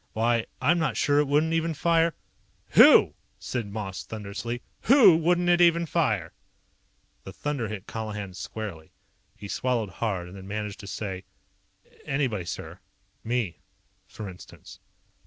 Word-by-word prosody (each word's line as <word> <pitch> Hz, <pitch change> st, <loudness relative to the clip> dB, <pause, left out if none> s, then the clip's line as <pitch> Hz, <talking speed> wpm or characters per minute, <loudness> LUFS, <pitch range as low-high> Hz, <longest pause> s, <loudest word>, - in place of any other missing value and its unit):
Why, 115 Hz, +1 st, +1 dB
I'm 175 Hz, 0 st, +3 dB
not 155 Hz, -4 st, -1 dB
sure 145 Hz, 0 st, +3 dB
it 150 Hz, -, +2 dB
wouldn't 150 Hz, +3 st, +2 dB
even 165 Hz, 0 st, 0 dB
fire 165 Hz, +1 st, +2 dB, 0.3 s
" -, -, -39 dB
"WHO?" -, -, +8 dB, 0.2 s
said 120 Hz, -4 st, -4 dB
Moss 100 Hz, -3 st, -5 dB
thunderously. 110 Hz, +3 st, -6 dB, 0.2 s
"WHO 230 Hz, -, +7 dB
wouldn't 175 Hz, +2 st, +2 dB
it 175 Hz, 0 st, +4 dB
even 170 Hz, 0 st, +4 dB
fire?" 110 Hz, -, 0 dB, 0.9 s
The -, -, -8 dB
thunder 145 Hz, -6 st, -3 dB
hit 105 Hz, -2 st, -6 dB
Colihan 105 Hz, -4 st, -5 dB
squarely. 95 Hz, -5 st, -7 dB, 0.4 s
He 100 Hz, -, -8 dB
swallowed 120 Hz, -1 st, -1 dB
hard, 95 Hz, -6 st, -1 dB
and 90 Hz, -, -11 dB
then 95 Hz, -1 st, -10 dB
managed 105 Hz, 0 st, -4 dB
to 100 Hz, -, -9 dB
say: 95 Hz, -2 st, -5 dB, 0.8 s
"Anybody, 130 Hz, -10 st, -1 dB
sir. -, -, -7 dB, 0.4 s
Me, 115 Hz, -6 st, -2 dB, 0.5 s
for 110 Hz, -, -8 dB
instance." 90 Hz, -2 st, -12 dB
115 Hz, 140 wpm, -26 LUFS, 100-160 Hz, 0.9 s, WHO